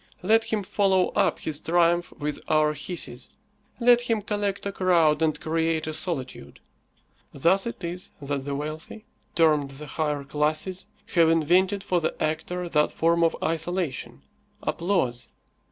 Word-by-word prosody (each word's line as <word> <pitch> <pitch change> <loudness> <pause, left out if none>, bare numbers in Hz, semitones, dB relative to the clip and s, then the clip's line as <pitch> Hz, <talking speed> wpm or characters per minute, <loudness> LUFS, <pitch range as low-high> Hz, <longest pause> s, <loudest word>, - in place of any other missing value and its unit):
Let 225 +4 +4
him 220 -2 -1
follow 190 -1 +2
up - - +1
his 150 -2 -3
triumph 175 +1 +2
with 150 0 -4
our 155 -1 +3
hisses. 155 +5 -5 0.5
Let 240 0 +5
him 230 -3 -1
collect 205 -2 -2
a 200 - -1
crowd 170 -5 +3
and 155 -1 +1
create 160 0 0
a 155 - -4
solitude. 130 - -5 0.7
Thus 185 - +2
it 235 - -7
is 175 +2 -5
that 140 -1 -3
the 140 -1 -2
wealthy, 155 +8 -6 0.3
termed 150 -4 +3
the 140 +2 -9
higher 150 -1 -2
classes, 155 +6 -1 0.3
have 165 -2 +5
invented 180 +5 +2
for 180 -3 0
the 160 - -2
actor 165 +3 -2
that 150 -3 +2
form 170 +1 +2
of 165 - +2
isolation, 165 -2 -2 0.4
applause. 170 -10 -1
165 Hz, 145 wpm, -25 LUFS, 150-185 Hz, 0.7 s, Let